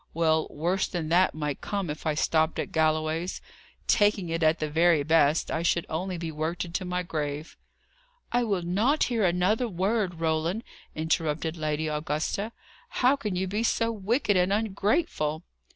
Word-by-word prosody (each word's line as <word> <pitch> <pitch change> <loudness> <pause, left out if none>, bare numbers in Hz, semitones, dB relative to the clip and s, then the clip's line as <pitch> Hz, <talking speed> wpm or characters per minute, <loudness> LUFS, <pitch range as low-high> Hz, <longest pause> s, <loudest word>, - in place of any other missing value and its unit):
Well, 160 -1 +2
worse 175 +6 0
than 165 -4 -4
that 180 +1 +3
might 150 -3 -3
come, 200 -3 -2
if 155 +2 -6
I 155 - +1
stopped 160 +1 +1
at - - -3
Galloway's. 155 +2 0 0.5
Taking 205 -4 +2
it 165 0 -2
at 160 +1 +4
the 155 - -2
very 160 0 +3
best, 155 0 +3
I 160 - -1
should 170 0 +1
only 180 +3 -3
be 165 -1 -4
worked 160 +4 -2
into 170 +2 -3
my 180 0 -2
grave." 150 -2 -4 0.8
"I 245 0 +2
will 200 -6 -1
not 215 - +2
hear 230 -3 0
another 185 +7 +2
word, 195 -1 0
Roland," 165 +6 -1 0.3
interrupted 160 0 -1
Lady 155 -1 -2
Augusta. 155 +7 -2 0.4
"How 255 +2 +3
can 210 -9 -3
you 185 +1 0
be 205 +4 -2
so 230 0 +1
wicked 215 +1 0
and 180 +1 +3
ungrateful?" 200 - 0
170 Hz, 165 wpm, -27 LUFS, 155-200 Hz, 0.8 s, at